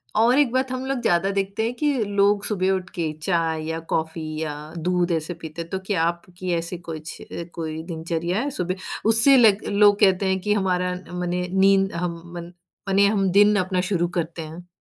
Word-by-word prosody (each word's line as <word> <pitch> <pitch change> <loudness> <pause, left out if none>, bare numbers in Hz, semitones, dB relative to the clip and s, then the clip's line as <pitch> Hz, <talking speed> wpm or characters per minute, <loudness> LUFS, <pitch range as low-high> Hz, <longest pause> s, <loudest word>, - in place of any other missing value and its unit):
और 235 +4 +4
एक 280 -5 +3
बात 260 +1 0
हम 255 0 -3
लोग 270 -2 -2
ज़्यादा 175 -3 +2
देखते 200 +2 -2
हैं 230 - -1
कि 295 +3 +1
लोग 205 0 +2
सुबह 190 -2 0
उठ 185 -1 -2
के 165 -3 -1
चाय 165 -3 0
या 160 0 -3
कॉफ़ी 160 0 -2 0.2
या 155 -2 -3 0.2
दूध 180 +1 0
ऐसे 165 +1 -1
पीते 165 -1 -8
हैं, 165 - -8
तो 190 - -3
क्या 185 -6 0
आपकी 175 +2 -3
ऐसी 170 +2 -3
कुछ 160 -2 -8 0.4
कोई 160 -1 -5
दिनचर्या 170 +2 -3
है? 280 +4 -1
सुबह 180 -7 -2 0.3
उससे 230 +5 +6
ल 225 -5 +7 0.2
लोग 205 0 +4
कहते 195 -2 +4
हैं 190 0 +1
कि 210 +2 0
हमारा 180 -2 0 0.2
मने 180 0 -2
नींद 195 0 +3
हम 170 -1 -3
मन 170 0 -7 0.4
मने 195 +1 +4
हम 200 -2 +1
दिन 205 +2 +5
अपना 185 0 0
शुरू 175 -2 +1
करते 165 0 -3
हैं। 165 +3 -9
180 Hz, 195 wpm, -23 LUFS, 170-200 Hz, 0.4 s, ल